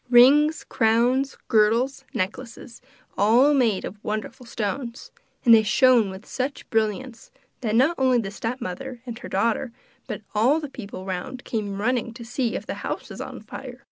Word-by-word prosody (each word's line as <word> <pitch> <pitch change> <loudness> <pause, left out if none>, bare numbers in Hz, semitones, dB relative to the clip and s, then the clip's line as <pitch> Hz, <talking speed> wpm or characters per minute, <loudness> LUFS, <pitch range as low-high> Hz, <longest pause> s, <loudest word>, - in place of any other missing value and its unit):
Rings, 285 +6 +6
crowns, 245 +4 +2
girdles, 230 +6 +2
necklaces 230 +4 -5 0.4
all 240 +8 +5
made 235 -8 +2
of 205 +2 -9
wonderful 215 +3 -4
stones; 235 +3 -4 0.3
and 235 - +8
they 225 - +8
shone 230 0 +4
with 190 +2 -9
such 265 +2 -4
brilliance 225 +2 -1 0.3
that 220 -3 -1
not 275 +8 +3
only 260 -1 +4
the 205 -4 -2
stepmother 235 +3 -5
and 235 -2 -7
her - - -8
daughter 230 +5 0 0.4
but - - -5
all 245 +9 +3
the 295 -3 -6
people 200 -7 -8
round 195 +8 -5
came 205 -3 -3
running 235 +1 -1
to 235 -1 -9
see 245 0 -1
if - - -4
the - - -4
house - - -4
was - - -7
on - - -7
fire. - - -10
235 Hz, 165 wpm, -24 LUFS, 215-260 Hz, 0.4 s, and